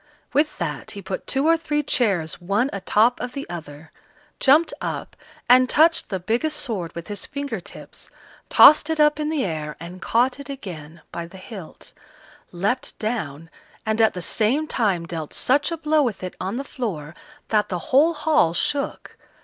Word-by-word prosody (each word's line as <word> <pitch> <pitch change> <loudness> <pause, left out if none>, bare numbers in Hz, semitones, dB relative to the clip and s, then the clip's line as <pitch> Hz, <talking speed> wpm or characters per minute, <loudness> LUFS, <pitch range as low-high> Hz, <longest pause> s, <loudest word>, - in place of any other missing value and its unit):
With 300 +3 +1
that 165 -4 -4
he - - -6
put 190 0 -5
two 270 +2 0
or 330 - +6
three 300 -2 -1
chairs 195 - 0
one 205 +9 0
a 200 - -4
top 230 +6 +3
of 250 - -4
the 275 - -6
other, 160 -2 -9 0.5
jumped 295 +5 +4
up, - - -4 0.3
and 255 +1 +6
touched 325 +2 +4
the 190 - -2
biggest 240 - 0
sword 210 - -3
with 170 0 -7
his 205 -1 -5
finger 280 0 -4
tips, - - -11 0.4
tossed 305 +1 +8
it 320 -1 -1
up 300 0 +4
in 300 0 -1
the 310 -6 0
air, 155 -4 -4
and 175 +2 -9
caught 250 +4 +1
it 280 - -9
again 170 - -8
by 170 0 -5
the 190 - -13
hilt; 185 -3 -11 0.6
leapt 205 +9 -2
down, 165 - -3 0.4
and 220 +1 +1
at 220 - +4
the 180 - -5
same 245 - +2
time 200 - 0
dealt 165 -3 -6
such 285 +5 +2
a 335 - -2
blow 310 -1 +2
with 235 -9 -2
it 185 - -5
on 190 +4 -3
the 275 - -3
floor 185 - -5 0.4
that 210 -2 +2
the 180 - -1 0.2
whole 315 +5 +5
hall 300 - +2
shook. 280 +9 -2
220 Hz, 180 wpm, -23 LUFS, 175-285 Hz, 0.6 s, tossed